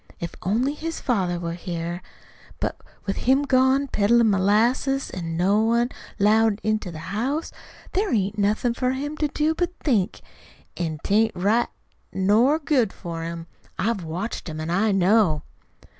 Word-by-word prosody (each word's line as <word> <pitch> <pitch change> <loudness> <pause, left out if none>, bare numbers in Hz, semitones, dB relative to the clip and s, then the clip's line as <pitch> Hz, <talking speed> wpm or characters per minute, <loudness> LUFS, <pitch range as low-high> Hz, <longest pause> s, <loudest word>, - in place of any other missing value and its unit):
If 170 - -5
only 235 +9 +1
his 325 +2 -5
father 185 -8 0
was 170 0 -4
here. 175 0 -4 0.6
But - - -1 0.3
with 195 - -2
him 265 +3 +3
gone 265 0 +3
peddlin' 230 0 +3
molasses, 230 +8 +2
an' 165 -2 -4
no 195 +4 +3
one 235 +2 +2 0.3
'lowed 215 +1 +3
into 215 -3 0
the 160 +3 -7
house, 275 +10 -1 0.4
there 395 +2 0
ain't 205 -1 0
anything 215 +4 +1
for 255 +1 0
him 290 +3 -4
to 305 - +1
do 305 +2 0
but 350 +2 -2
to - - -26
think. 215 - +1 0.5
An' 160 -3 -3
'tain't 220 +1 +2
right 210 +6 +2 0.4
nor 215 +10 +3
good 280 -9 +1
for 170 -2 -6
him. 165 0 -5 0.3
I've 220 -3 -1
watched 175 +4 -4
him 155 0 -6
an' 160 +1 -3
I 205 +4 +2
know." 195 -4 +3
215 Hz, 160 wpm, -24 LUFS, 180-255 Hz, 0.6 s, him